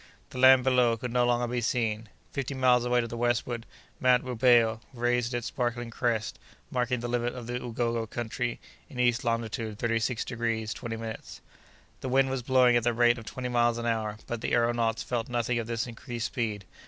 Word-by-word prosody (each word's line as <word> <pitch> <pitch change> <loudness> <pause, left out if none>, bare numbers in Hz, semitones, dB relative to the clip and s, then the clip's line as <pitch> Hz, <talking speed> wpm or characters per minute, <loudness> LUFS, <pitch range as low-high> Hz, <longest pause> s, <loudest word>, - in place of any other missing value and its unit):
The 125 - -6
land 130 0 +7
below 125 -3 +3
could 120 +1 -5
no 125 -1 +3
longer 120 0 +2
be 120 0 -2
seen. 110 -2 -1 0.2
Fifty 140 0 -3
miles 125 -2 +3
away 125 0 +3
to 115 - -4
the 120 - -6
westward, 120 0 -1 0.3
Mount 125 -1 +4
Rubeho 120 -2 +3
raised 120 0 0
its 120 -1 -3
sparkling 120 -2 -2
crest, 115 -2 -1 0.3
marking 125 -1 0
the 120 - -3
limit 120 0 -1
of 125 -2 -7
the 120 +1 -3
Ugogo 115 -1 -2
country 120 +1 -3 0.3
in 130 -5 -9
east 120 -2 +2
longitude 115 -2 -2
thirty 115 0 0
six 115 +1 -1
degrees 115 -3 -2
twenty 120 -3 -5
minutes. 110 -1 -7 0.6
The 130 - -4
wind 135 +1 +3
was 135 -1 -2
blowing 125 -1 +4
at 120 - +3
the 120 0 +2
rate 120 0 +4
of 115 - -11
twenty 125 +3 -5
miles 120 -1 +2
an 120 - -4
hour, 110 -2 -1
but 120 -1 -4
the - - -2
aëronauts 115 -1 +1
felt 120 -1 -2
nothing 120 0 0
of 115 - -4
this 115 0 -1
increased 120 0 -5
speed. 110 -6 -3
120 Hz, 200 wpm, -28 LUFS, 115-125 Hz, 0.6 s, land